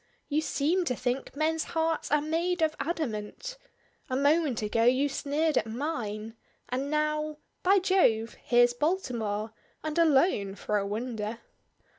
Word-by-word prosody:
You 300 +1 +2
seem 315 +4 +1
to 250 - 0
think 250 +3 -2
men's 315 +1 +1
hearts 325 0 0
are 295 0 +3
made 335 +2 0
of 310 -1 +1
adamant! 310 - -3 0.5
A 255 - -1
moment 285 -3 +2
ago 225 +2 +1
you 255 +4 +4
sneered 290 +2 +1
at - - -4
mine, 225 -4 -3 0.4
and 265 +3 -2
now 305 0 0 0.2
By 390 +2 +5
Jove! 355 - +3
Here's 240 0 +4
Baltimore 235 - -1 0.3
and 310 +1 -1
alone, 270 - +3
for 210 0 -1
a 200 - -2
wonder." 220 0 -3
285 Hz, 140 wpm, -29 LUFS, 230-320 Hz, 0.5 s, By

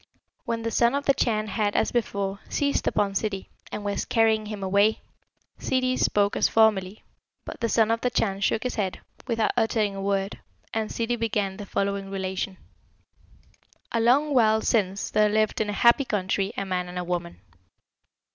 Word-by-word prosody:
When 230 -1 -2
the 230 - -2
Son 235 +3 +3
of 280 - -2
the 275 - +4
Chan 215 -5 0
had, 205 0 -1
as - - +2
before, 200 -4 -2
seized 280 -1 0
upon 200 -1 +1
Ssidi, 195 -1 -3 0.2
and 205 - -5
was 200 0 -1
carrying 220 -2 +2
him 210 -2 -6
away, 200 +3 +3 0.6
Ssidi 255 0 0
spoke 205 -4 +2
as - - +3
formerly, 215 -3 +2 0.4
but - - -8
the 230 -2 -1
Son 225 -1 +3
of 230 - 0
the 250 - +1
Chan 195 -5 -1
shook 220 +2 +1
his 250 - -2
head, 195 -3 -2 0.3
without 225 -3 +1
uttering 215 -3 +1
a 195 - -5
word, 195 0 -1 0.3
and 220 -1 -1
Ssidi 235 +1 -2
began 205 -4 -1
the 205 - -8
following 200 0 -2
relation: 190 0 -3 1.3
"A 230 - 0
long 280 +6 +3
while 220 -3 +4
since 200 -4 0
there 210 0 +3
lived 215 +1 +1
in 210 - -1
a 205 - -2
happy 235 +4 +6
country 195 -2 -1
a 195 - -2
man 180 -1 -2
and 180 - -7
a 180 - -2
woman. 175 - -4
210 Hz, 180 wpm, -25 LUFS, 195-230 Hz, 1.3 s, happy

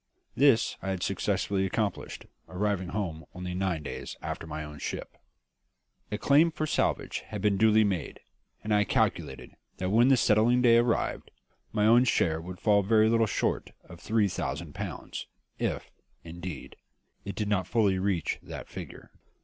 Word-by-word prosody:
This 135 -4 +4
I 95 - -4
had 95 -2 -2
successfully 100 -1 0
accomplished, 100 +1 -2 0.2
arriving 95 -1 -1
home 90 -6 -3
only 90 0 -5
nine 90 -4 -1
days - - -6
after - - -5
my 75 0 -5
own 75 -1 -9
ship. - - -5 1.0
A 105 - -1
claim 145 +9 +4
for 155 -2 -3
salvage - - 0
had 105 - -5
been 100 0 +2
duly 110 +1 +5
made, 95 -7 -2 0.4
and 105 0 0
I 105 0 +4
calculated 65 -8 -1 0.3
that 95 0 -2
when 115 +4 +5
the 135 -1 +5
settling 120 +3 +3
day 115 -1 +6
arrived, 120 0 0 0.4
my 105 - +1
own 120 +3 +6
share 80 -9 +1
would 90 +1 -8
fall 105 -2 +4
very 110 +2 +4
little 115 -1 +3
short - - -1
of 85 -1 -13
three 110 +1 +1
thousand 75 -3 -4
pounds, - - -6 0.3
if, - - -2 0.3
indeed, 85 -1 -8 0.5
it 100 - -6
did 105 - -2
not 100 -3 0
fully 100 -5 +2
reach 95 -3 -1
that - - -8
figure. - - -9
100 Hz, 160 wpm, -28 LUFS, 90-110 Hz, 1.0 s, day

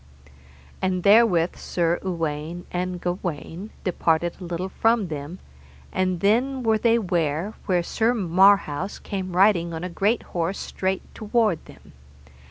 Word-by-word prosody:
And 185 -1 0
therewith 200 -5 +5
Sir 170 -1 0
Uwaine 165 -1 -3
and 180 0 -2
Gawaine 175 +1 -4
departed 170 -2 0
a - - -6
little 175 +2 -4
from 225 -2 +1
them, 150 +3 -6 0.6
and 185 -2 0
then 250 +6 +2
were 220 -1 +2
they 230 +1 +3
ware 175 -2 -1
where 180 -3 +2
Sir 230 +7 +1
Marhaus 190 -2 +3
came 185 -3 -5
riding 175 -4 +3
on 160 - -5
a 180 - -3
great 205 +6 0
horse 175 +2 -1
straight 190 0 -2
toward 215 -5 0
them. - - -16
185 Hz, 135 wpm, -24 LUFS, 170-205 Hz, 0.6 s, therewith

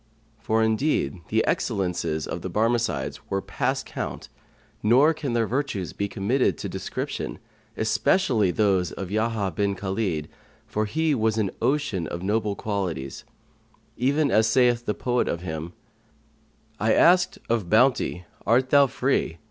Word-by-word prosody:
For, 110 0 +1
indeed, 110 - 0
the - - +1
excellences 85 -5 -1
of - - -5
the - - -4
Barmecides 115 - -1
were 95 - 0
past - - -2
count - - -6 0.5
nor 130 +9 +5
can 145 -5 -4
their 115 -1 +2
virtues 120 -7 -2
be 100 - -2
committed 110 +7 0
to - - -5
description, - - -4 0.4
especially 110 - +2
those 95 -4 +1
of 95 -1 -6
Yahya 110 -2 0
bin 100 -1 0
Khalid, 95 -5 -2 0.4
for 105 0 -1
he 155 +7 0
was 110 -3 +1
an 105 -4 0
ocean[FN#132] 120 - 0
of 85 +3 -5
noble 105 +1 0
qualities, 90 -12 -4 0.7
even 140 +3 +1
as 110 +2 +4
saith 120 0 +3
the 105 - 0
poet 125 -1 0
of 85 - -2
him, 80 -1 -5 1.1
"I 110 +2 +3
asked 180 +1 +4
of 115 -6 -1
Bounty, 110 -6 +2 0.2
Art 130 +3 +3
thou 140 -1 +6
free?' 125 -10 0
110 Hz, 140 wpm, -25 LUFS, 95-125 Hz, 1.1 s, thou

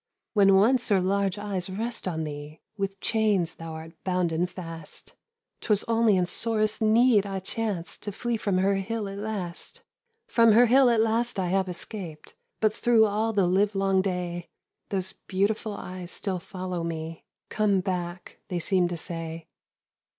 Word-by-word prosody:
"When 195 -2 +6
once 235 +6 +4
her 200 -2 +4
large 195 +1 +1
eyes 200 -3 -4
rest 225 +3 -4
on 160 -3 -2
thee, 150 0 -7 0.2
With 195 -1 -3
chains 210 -6 +1
thou 165 -1 -8
art 160 +1 -8
bounden 180 -2 0
fast; 165 -3 -9 0.5
'Twas 210 -2 +1
only 225 -3 +4
in 180 - +2
sorest 215 +3 0
need 220 -1 +4
I 195 -1 -3
chanced 190 -4 -3
To 205 - -4
flee 240 +4 -2
from 200 -4 0
her 195 +1 +2
hill 210 +2 -3
at 195 0 -6
last. 200 -5 -5 0.4
"From 230 -2 +5
her 240 +3 +7
hill 255 +2 +6
at 230 -2 +3
last 225 +1 +1
I 180 -2 0
have 190 0 +1
escaped, 175 -3 -6 0.3
But 215 -1 +3
through 230 -1 +4
all 215 +2 0
the 200 -4 +2
livelong 195 +1 +2
day, 180 -2 -3 0.4
Those 190 -2 -2
beautiful 205 +2 0
eyes 185 -2 -7
still 185 -1 -3
follow 180 0 -5
me. 165 -1 -5 0.3
'Come 210 -3 +2
back!' 180 -1 -4
they 180 - -3
seem 180 +1 +2
to 175 0 -4
say. 165 -1 -5
195 Hz, 160 wpm, -27 LUFS, 175-215 Hz, 0.5 s, her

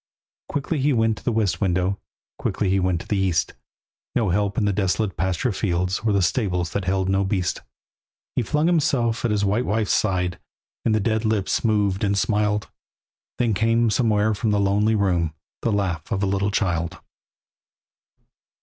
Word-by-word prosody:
Quickly 145 +2 -2
he 140 +2 +2
went 115 -2 +1
to - - -20
the - - 0
west 110 -4 0
window, 90 0 +1 0.4
Quickly 95 - -1
he 95 - +3
went 90 -2 0
to - - -12
the 105 - 0
east; 85 -9 +1 0.6
No 110 -5 +2
help 100 +2 0
in 110 - +2
the 100 - +1
desolate 95 +1 0
pasture 95 +8 0
fields, 90 -2 -1
Or 110 0 0
the 100 -2 +2
stables 90 -3 0
that 100 -2 -2
held 95 0 0
no 95 +1 +2
beast. 95 -2 -1 0.7
He - - +2
flung 150 +7 0
himself 140 -9 +1
at - - +1
his 105 -1 +1
white 105 +6 0
wife's 105 0 +1
side, 90 -4 0 0.4
And 110 - +2
the - - +2
dead 110 +2 0
lips 110 -3 0
moved 105 -3 +1
and 100 -1 +1
smiled, 105 0 +1 0.7
Then 120 -3 +1
came 115 +2 +2
somewhere 110 -2 +2
from 110 +2 -1
the 105 -1 +2
lonely 105 +3 +2
room 90 -6 +1 0.3
The 115 - 0
laugh 90 -6 -2
of 100 -2 0
a - - +3
little 100 +1 0
child. 85 -3 -1
100 Hz, 175 wpm, -23 LUFS, 95-110 Hz, 0.7 s, he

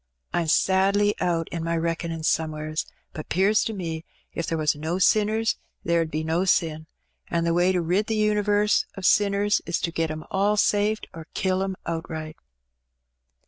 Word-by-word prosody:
I'm 170 -2 0
sadly 195 +5 +3
out 165 -2 0
in 170 -1 -4
my 165 0 -1
reck'nin' 165 0 -2
somewheres, 155 -1 -1 0.3
but 155 - -8
'pears 195 +5 +3
to 225 - -2
me 165 -5 -4 0.3
if 170 - -3
there 165 - -1
was 155 -2 +1
no 160 +4 -2
sinners 215 +3 +2 0.3
there 170 0 +2
'ud 165 - -2
be 155 +1 -2
no 165 +3 0
sin; 160 -4 +1 0.4
an' 170 -1 0
the 170 0 +1
way 175 +2 +3
to 180 -2 0
rid 185 +6 +1
the 220 - -1
univarse 210 0 +2
of 195 - -5
sinners 205 +1 +3
is 170 - 0
to 170 - -1
get 165 -1 -1
'em 155 0 -5
all 200 +2 +2
saved 210 +1 +1
or 160 -1 -9
kill 190 0 0
'em 190 0 -2
outright." 160 -1 -5
170 Hz, 180 wpm, -25 LUFS, 160-205 Hz, 0.4 s, sadly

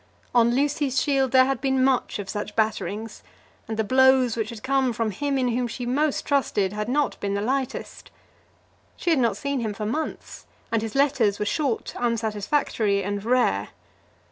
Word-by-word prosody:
On 240 0 +4
Lucy's 280 -1 +1
shield 270 -2 +1
there 260 -1 +6
had 270 -2 -1
been 265 -1 +2
much 260 -1 +1
of 200 -2 -6
such 210 +1 -5
batterings, 220 0 -2 0.5
and 220 0 -4
the 220 - +1
blows 260 0 +4
which 220 -2 -2
had 225 -2 -9
come 265 -2 +1
from 225 -1 -1
him 275 +7 -1
in 255 -2 +1
whom 245 +1 0
she 245 +1 -5
most 285 +4 0
trusted 210 -8 +1
had 210 +2 -3
not 290 +3 0
been 200 0 -2
the - - 0
lightest. 265 +2 -3 0.9
She 345 - 0
had 315 - +3
not 235 -3 +1
seen 280 -1 -2
him 220 -3 -3
for 210 - -4
months, 305 +9 -5 0.2
and 225 -1 +1
his 225 +1 -5
letters 260 -8 +2
were 210 - -2
short, 270 0 -1
unsatisfactory, 220 -2 0
and 200 +1 -3
rare. 225 - +1
240 Hz, 180 wpm, -24 LUFS, 215-270 Hz, 0.9 s, there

